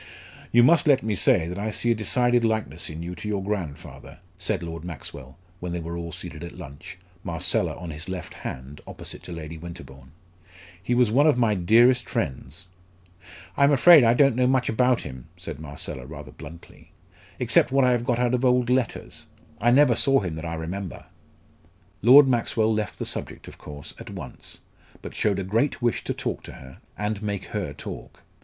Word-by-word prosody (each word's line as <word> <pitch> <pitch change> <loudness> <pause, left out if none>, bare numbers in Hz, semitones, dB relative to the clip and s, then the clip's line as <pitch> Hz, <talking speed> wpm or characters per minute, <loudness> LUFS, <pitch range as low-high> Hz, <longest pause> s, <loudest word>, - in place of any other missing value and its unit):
"You 120 +1 +6
must 170 +5 +5
let 135 -3 +4
me 110 -1 -1
say 80 -2 +3
that 90 +3 -5
I 105 +2 -2
see 120 +2 0
a - - +5
decided 120 +3 +2
likeness 110 -7 -1
in 80 +1 -7
you 90 +1 -5
to 90 +4 -8
your 100 -2 -2
grandfather," 95 -8 -6 0.2
said - - -2
Lord 85 -1 -6
Maxwell, 70 -5 -8 0.2
when 90 -1 -5
they 85 - -2
were 85 +1 -5
all 85 -1 -5
seated 80 0 -8
at 85 - -9
lunch, 80 +8 -10 0.3
Marcella 85 +1 0
on 85 -2 -7
his 75 +5 -8
left 90 -3 -6
hand, 65 +3 -8
opposite - - -6
to - - -10
Lady 80 -1 -7
Winterbourne. 70 -6 -11 0.7
"He 120 +6 0
was 120 -3 +3
one 140 +6 +4
of 150 - +4
my 115 -3 +3
dearest 115 +7 +4
friends." 70 +7 -4 0.9
"I'm 140 +1 +4
afraid 150 +2 +8
I 115 +1 +4
don't 135 -2 +4
know 125 0 +2
much 130 -1 +2
about 125 +2 +2
him," 65 -2 -9
said 85 -5 -7
Marcella, 70 -4 -6
rather 75 -3 -9
bluntly, 80 +5 -13 0.4
"except - - +2
what 135 -1 +4
I 125 - +4
have 120 -1 +1
got 120 -1 0
out 125 0 +1
of 125 +1 0
old 125 -1 +3
letters. 130 -2 -2 0.3
I 120 - +4
never 130 0 +5
saw 135 +3 +3
him 90 -5 -4
that 80 +1 -6
I 85 0 -3
remember." 90 +3 -6 1.0
Lord 135 +5 +8
Maxwell 115 -3 +1
left 110 -1 -3
the - - -4
subject, - - -5
of - - -12
course, 75 -1 -9
at - - -9
once, - - -9 0.4
but - - -7
showed 100 -3 0
a 100 - -2
great 115 +9 0
wish 120 -2 0
to - - -1
talk - - -3
to - - -9
her, 65 0 -13 0.2
and 105 +1 -2
make 105 -2 -3
her - - -2
talk. - - -9
100 Hz, 195 wpm, -25 LUFS, 80-120 Hz, 1.0 s, afraid